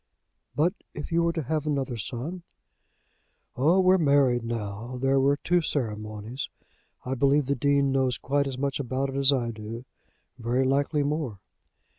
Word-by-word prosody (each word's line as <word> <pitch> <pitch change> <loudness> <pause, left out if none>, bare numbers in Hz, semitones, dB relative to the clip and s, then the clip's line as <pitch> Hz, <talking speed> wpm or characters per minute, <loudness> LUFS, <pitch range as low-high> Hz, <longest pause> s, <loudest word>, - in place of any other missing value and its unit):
"But 160 +7 +2 0.2
if 150 - -6
you 170 +1 +3
were 170 0 +1
to 165 -2 -2
have 155 +2 -2
another 135 -4 -1
son?" 125 - -5 1.1
"Oh! 160 +9 +4
we're 185 0 +5
married 140 -6 +3
now! 115 +1 -4
There 135 +1 +3
were 140 +2 +3
two 175 +3 +2
ceremonies. 110 -3 -3 0.6
I 130 - -2
believe 140 +2 +3
the 140 - +1
Dean 140 +1 +2
knows 130 -3 +1
quite 140 +1 0
as 130 -2 -4
much 140 +1 -1
about 135 +1 -1
it 135 - -6
as 140 0 +5
I 120 -4 0
do; 110 +2 -7 0.5
very 120 +3 +1
likely 140 +2 +1
more. 145 -7 -2
135 Hz, 160 wpm, -27 LUFS, 120-145 Hz, 1.1 s, we're